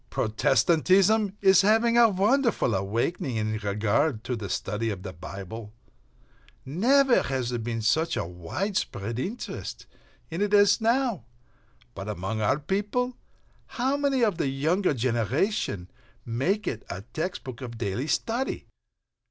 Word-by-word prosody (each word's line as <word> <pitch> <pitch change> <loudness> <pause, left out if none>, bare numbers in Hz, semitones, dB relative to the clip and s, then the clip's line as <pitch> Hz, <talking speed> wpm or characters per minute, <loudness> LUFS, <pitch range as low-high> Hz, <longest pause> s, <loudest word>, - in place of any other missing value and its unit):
Protestantism 185 - +3
is 190 -2 +6
having 225 +3 +3
a 235 -1 +7
wonderful 215 - +2
awakening 115 - -1
in 110 0 -1
regard 105 +5 0
to 125 - -2
the 105 -4 -6
study 105 +5 -2
of 95 -3 -5
the 95 -2 -6
Bible. 100 +5 -8 0.9
Never 245 - +4
has 130 -2 -2
there 120 - -2
been 115 0 -3
such 160 +9 +1
a - - -1
widespread 105 - -3
interest 220 - -5 0.5
in 165 +4 -3
it 205 0 +2
as 205 +2 +5
now. 230 - +1 0.7
But 95 +4 -6
among 105 +2 -3
our 120 +6 +2
people, 205 - -1 0.6
how 260 +3 +1
many 280 -3 +1
of 205 -6 +1
the - - +1
younger 155 +6 +1
generation 120 - -1 0.3
make 175 - -1
it 110 - -3
a 90 - -5
text 180 +4 -3
book 130 -2 -8
of 120 -2 -7
daily 110 +5 -2
study? 235 +9 -1
140 Hz, 135 wpm, -26 LUFS, -, 0.9 s, a